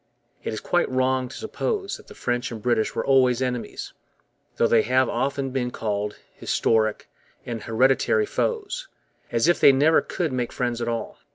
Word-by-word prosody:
It - - -3
is 110 - -4
quite 175 - +1
wrong 130 0 +1
to - - -10
suppose 400 - -3
that - - -18
the - - -13
French 120 0 -2
and 115 - -6
British 110 -1 0
were - - -1
always 130 -3 +4
enemies, 125 -2 -4 0.6
though - - +2
they 115 -1 +4
have 130 +3 +2
often 135 +3 -1
been 125 -2 -1
called 105 -3 -3 0.2
'historic' 110 -1 0 0.4
and 115 -2 -4
'hereditary' 135 - +2
foes, 470 +3 -2 0.4
as 115 +3 +2
if 175 - +3
they - - +8
never 145 +4 +4
could 165 -7 -3
make 125 -2 -2
friends 120 -1 -2
at 120 - -2
all. 115 -1 -3
125 Hz, 175 wpm, -24 LUFS, 115-140 Hz, 0.6 s, they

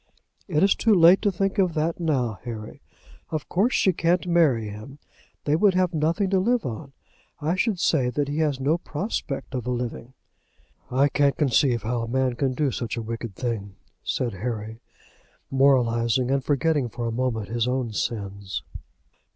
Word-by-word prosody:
"It's 185 +2 +3
too 225 -2 +3
late 175 +2 +7
to 205 - +2
think 195 +2 -1
of 180 -4 +2
that 160 +3 -1
now, 130 - 0
Harry. 110 -3 -7 0.5
Of 155 -3 -4
course 210 +8 +1
she 190 - +3
can't 170 +2 +1
marry 155 -11 +3
him. 110 +7 -9 0.5
They 145 - +2
would 190 +2 +3
have 185 -1 +2
nothing 165 +5 0
to 190 - +3
live 235 +4 +1
on. 135 +4 -6 0.5
I 155 +2 0
should 190 0 0
say 135 -8 +2
that 145 +3 -1
he 145 +2 -2
has 150 -4 +1
no 150 +6 +1
prospect 155 -5 -4
of 125 -2 -3
a - - 0
living." 125 0 -4 0.7
"I 135 +3 +3
can't 140 0 +2
conceive 130 -5 +2
how 115 +2 -1
a 115 - -4
man 130 +1 +1
can 130 +1 -1
do 140 0 +1
such 120 0 -4
a 115 - -3
wicked 115 -2 -5
thing," 105 -6 -4 0.3
said 120 -4 -1
Harry, 110 +2 -5 0.7
moralizing, 125 -2 +3
and 135 -1 +1
forgetting 145 -2 +1
for 120 +2 -5
a 115 - -1
moment 115 -3 -2
his 120 +1 0
own 125 -3 -1
sins. 100 -2 -4
135 Hz, 175 wpm, -25 LUFS, 115-165 Hz, 0.7 s, late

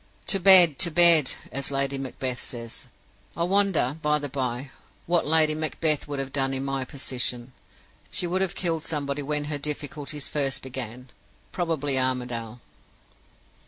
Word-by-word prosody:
"'To 195 - +1
bed! 180 -6 +7
to 180 - +3
bed!' 165 -4 +5 0.2
as 135 +1 -2
Lady 140 0 0
Macbeth 130 -2 -4
says. 115 -2 -7 0.5
I 170 - +1
wonder, 180 -6 +2
by 150 0 +3
the 145 -1 -4
by, 130 0 -3 0.3
what 170 -2 +1
Lady 155 0 +5
Macbeth 155 0 0
would 145 -1 -4
have 135 0 -4
done 135 -1 +1
in 135 +1 -2
my 135 -1 -1
position? 125 -2 -4 0.6
She - - -3
would 180 +2 -1
have 190 -1 -1
killed 165 -3 -1
somebody 145 -3 -2
when 150 +1 -1
her 145 -1 -3
difficulties 150 0 -4
first 140 -3 -1
began. 125 -1 -7 0.4
Probably 150 -6 -1
Armadale. 125 -3 -2
145 Hz, 150 wpm, -26 LUFS, 130-160 Hz, 0.6 s, bed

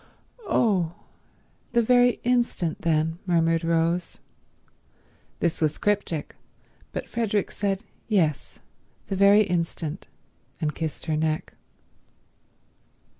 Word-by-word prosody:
"Oh—the 205 - -2
very 245 +1 +4
instant 240 -9 0
then," 160 0 +1
murmured 165 -1 +2
Rose. 165 +1 0 1.2
This 170 -1 0
was 155 -1 +1
cryptic, 200 -7 -1 0.6
but - - -5
Frederick 215 -4 -1
said, 200 0 -2 0.2
"Yes, 170 -9 0 0.5
the 195 - -1
very 200 +2 +6
instant," 170 -3 -3 0.5
and 155 -3 -1
kissed 160 -2 -4
her 160 -2 0
neck. 155 0 -1
175 Hz, 90 wpm, -25 LUFS, 160-205 Hz, 1.2 s, very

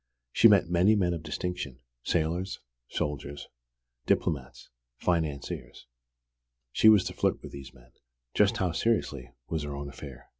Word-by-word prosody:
She 115 - +7
met 100 -5 +5
many 90 +5 +4
men 90 -4 +2
of 85 - -4
distinction, 80 -4 -4 0.2
sailors, 85 +6 -1 0.3
soldiers, 70 0 -4 0.6
diplomats, 65 -5 -1 0.3
financiers. 80 -5 -2 0.9
She 110 - +6
was 105 -4 +7
to - - -4
flirt - - 0
with - - -8
these 70 -1 -9
men - - -20 0.4
just - - +3
how 90 -2 0
seriously, 80 - 0 0.2
was 80 -2 -2
her 75 -1 -5
own 70 0 -5
affair! 70 -3 -11
80 Hz, 140 wpm, -29 LUFS, 70-90 Hz, 0.9 s, She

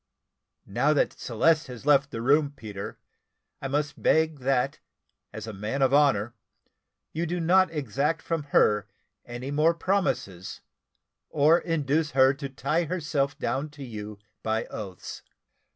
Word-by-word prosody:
Now 125 +9 +2
that 145 - +1
Celeste 155 +7 +1
has 125 0 -9
left 140 -1 +4
the 115 -3 -5
room, 145 +2 +3
Peter, 105 -7 -7 0.6
I 135 - -3
must 145 +2 -2
beg 160 -2 +2
that, 130 -1 0 0.5
as 110 - -7
a 110 - -6
man 105 +8 -2
of 135 0 +3
honour, 125 -6 +3 0.8
you 165 +2 -2
do 175 +2 -2
not 185 +3 +4
exact 150 +2 -1
from 165 -3 -2
her 105 -7 +3 0.4
any 120 +3 -6
more 155 +3 +3
promises, 130 - -2 0.7
or 155 +3 +4
induce 150 -2 0
her 130 0 +6
to 140 0 -6
tie 150 +6 -1
herself 150 -5 -1
down 135 +6 -2
to 140 - -7
you 105 -4 -7 0.2
by 110 +1 -1
oaths. 95 -4 -7
140 Hz, 140 wpm, -27 LUFS, 120-155 Hz, 0.8 s, her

